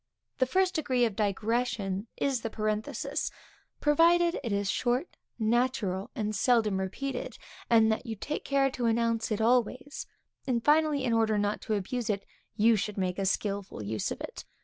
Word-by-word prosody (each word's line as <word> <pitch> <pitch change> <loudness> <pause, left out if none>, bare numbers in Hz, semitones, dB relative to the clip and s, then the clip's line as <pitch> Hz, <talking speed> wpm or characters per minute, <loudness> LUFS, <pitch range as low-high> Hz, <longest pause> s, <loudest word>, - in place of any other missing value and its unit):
The 255 - +3
first 370 +6 +2
degree 255 -6 +2
of 220 -4 -2
digression 210 -1 -1
is 270 -4 0
the 225 - -3
parenthesis; 215 0 -2 0.5
provided 335 +3 +4
it 230 - -3
is 200 0 0
short, 250 +6 -1 0.2
natural, 220 -4 0
and 215 -1 -2
seldom 215 -3 +2
repeated; 275 - -4 0.3
and 225 -1 +5
that 220 +3 -2
you 225 - -3
take 300 +9 -4
care 275 -1 +2
to 245 -2 -1
announce 230 0 +1
it 215 +1 0
always; 255 +4 +1 0.4
and 235 -3 0
finally, 300 -2 +3
in 240 -3 +1
order 220 -2 +2
not 205 0 0
to 215 - -1
abuse 225 +4 -3
it, 200 -2 -1 0.3
you 225 +2 +5
should 210 0 -3
make 185 -1 -1
a 195 - +1
skilful 200 - -2
use 105 0 -2
of - - -5
it. - - -7
225 Hz, 170 wpm, -29 LUFS, 205-255 Hz, 0.5 s, and